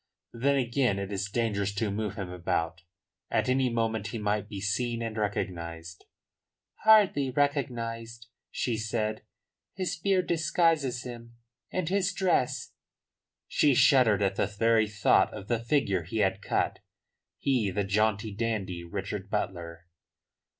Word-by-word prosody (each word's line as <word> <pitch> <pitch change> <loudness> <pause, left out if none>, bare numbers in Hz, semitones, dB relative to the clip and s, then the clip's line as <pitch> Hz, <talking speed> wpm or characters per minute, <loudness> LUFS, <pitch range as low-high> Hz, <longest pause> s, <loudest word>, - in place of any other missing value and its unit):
Then 140 +4 +2
again 125 -4 +1
it 100 0 -4
is 100 0 -2
dangerous 100 -3 -1
to 105 0 0
move 105 -1 -3
him 95 -3 -5
about. 85 -1 -2 0.5
At - - +1
any 130 0 +2
moment 115 -3 -1
he 115 - -5
might 105 0 -1
be 100 -3 -5
seen 115 +4 -1
and 115 -1 -4
recognised." 85 -5 -4 0.8
"Hardly 205 -11 +5
recognised," 120 -5 -2 0.2
she 120 -3 -1
said. 110 -1 -2 0.5
"His 185 -2 -2
beard 185 +1 +1
disguises 165 -6 +1
him, 120 -1 -9 0.4
and 185 -3 -1
his 195 +1 +1
dress 180 -10 0 0.4
" - - -63 0.3
She 145 -3 +3
shuddered 125 -7 +5
at 95 0 0
the - - +2
very 110 +2 +2
thought 105 -1 +3
of 95 - -8
the 120 -1 +1
figure 115 - +1
he 100 +8 -5
had 95 -3 +1
cut, - - -1 0.6
he, 125 -7 +1
the 100 +2 -1
jaunty, 105 +1 +1
dandy 100 -5 -2
Richard 95 +2 -5
Butler. 85 -5 -4
110 Hz, 140 wpm, -28 LUFS, 100-130 Hz, 0.8 s, Hardly